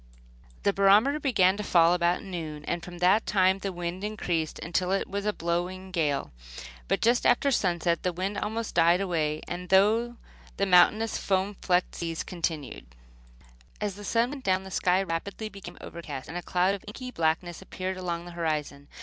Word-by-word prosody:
The 200 - +2
barometer 210 +10 +4
began 200 -9 +3
to 210 - -3
fall 170 -3 +4
about 175 0 +1
noon, 160 -6 -6
and 170 -1 -2
from 175 0 -9
that 185 +5 +3
time 190 -1 +3
the 195 0 -3
wind 175 +1 -5
increased 175 -7 -2
until 180 +3 -1
it 195 - 0
was 200 +1 -1
blowing 175 +2 -3
a - - -14
gale; 155 -5 -1 0.6
but - - 0
just 235 +1 +3
after 275 +3 +3
sunset 175 -6 +1
the 180 - 0
wind 190 +4 -3
almost 220 +1 -3
died 170 +1 +4
away, 155 -5 -1 0.3
though 220 +5 +3 0.4
the 200 - +2
mountainous 210 +4 +4
foam 195 +1 0
flecked 180 -1 +1
seas 165 -1 -4
continued. 160 - -4 0.9
As 205 -2 -2
the 205 +2 -10
sun 230 +4 +1
went 280 -2 -7
down 190 0 +1
the 190 - -10
sky 185 +1 +2
rapidly 195 +5 -4
became 195 -4 -10
overcast, 150 -6 -7
and 170 - -8
a 175 - -2
cloud 180 +2 +1
of 200 - -6
inky 255 +4 -7
blackness 165 -1 -1
appeared 190 0 -4
along 175 -2 -4
the 175 - -9
horizon. 150 -4 -3
185 Hz, 175 wpm, -27 LUFS, 170-200 Hz, 0.9 s, barometer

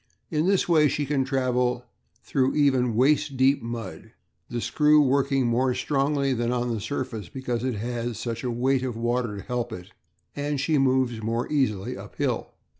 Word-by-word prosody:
In 155 +2 +1
this 195 -1 +2
way 155 -3 +5
she 145 +1 -1
can 140 -1 +1
travel 125 -2 0 0.4
through 130 0 0
even 130 -5 +2
waist 135 +2 +2
deep 135 +2 +3
mud, 115 -1 -7 0.4
the 120 - -3
screw 150 +5 +4
working 135 -1 +2
more 125 +2 +1
strongly 140 +1 0
than 120 0 -1
on 120 -1 -1
the 110 - -3
surface, 120 - -4
because 125 -1 -3
it 130 -2 -1
has 120 +1 -3
such 115 0 -4
a 125 - -1
weight 130 +2 +1
of 125 -3 -3
water 120 -2 -1
to 100 - -7
help 120 -1 -3
it, 90 -5 -8 0.4
and 145 0 -2
she 150 +1 +1
moves 130 -3 +1
more 115 +2 -1
easily 125 -5 0
uphill. - - -3
125 Hz, 175 wpm, -25 LUFS, 120-140 Hz, 0.4 s, way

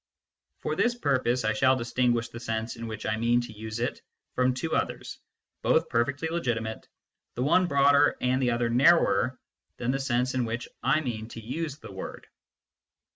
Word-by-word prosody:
For - - -2
this 240 0 +2
purpose 130 - +1
I 110 - +2
shall 130 +4 +4
distinguish 120 -1 0
the 115 - -8
sense 115 0 -3
in 115 -1 -6
which 110 -1 -6
I 110 - 0
mean 120 +2 +3
to 120 -2 -8
use 110 +1 -6
it 120 - -2 0.3
from 125 0 +2
two 125 - -3
others, - - -3 0.4
both - - +2
perfectly 135 +7 0
legitimate, 120 -9 -2 0.5
the 125 - -1
one 180 +6 +4
broader 140 0 +4
and 130 +1 +1
the 125 - +2
other 120 0 0
narrower 130 - +4 0.4
than 125 +1 -1
the 135 - -1
sense 130 -1 0
in 130 -1 +1
which 115 +1 -3
I 135 +6 +2
mean 110 -6 -4
to 115 - -9
use 140 +6 -4
the 150 - -11
word. 95 - -7
125 Hz, 180 wpm, -27 LUFS, 115-135 Hz, 0.5 s, shall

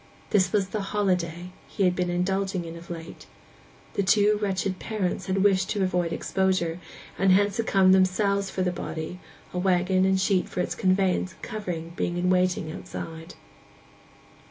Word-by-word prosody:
This 185 -3 +3
was 200 -2 +1
the 215 +1 -2
'holiday' 180 -3 -1 0.2
he 200 - -2
had 180 -1 +3
been 180 -1 -1
indulging 190 +1 -1
in 165 0 -7
of 170 0 -12
late. 165 -1 -8 0.7
The - - 0
two 205 +2 +3
wretched 190 -2 -1
parents 210 -5 -2
had 190 0 +1
wished 190 -2 +3
to 200 - 0
avoid 180 -2 0
exposure; 185 -1 0 0.4
and 195 0 +4
hence 200 +1 +3
had 230 - -1
come 190 -1 +5
themselves 195 +1 +2
for 185 - -2
the 180 - +1
body, 160 +1 -5 0.3
a 180 - -1
waggon 185 0 +2
and 190 0 +2
sheet 190 -1 +1
for - - -5
its - - 0
conveyance 185 -1 +1
and - - -24
covering 175 -7 -5
being 175 0 -2
in 180 +1 +1
waiting 180 -3 +1
outside. 160 +1 -8
185 Hz, 170 wpm, -26 LUFS, 175-195 Hz, 0.7 s, come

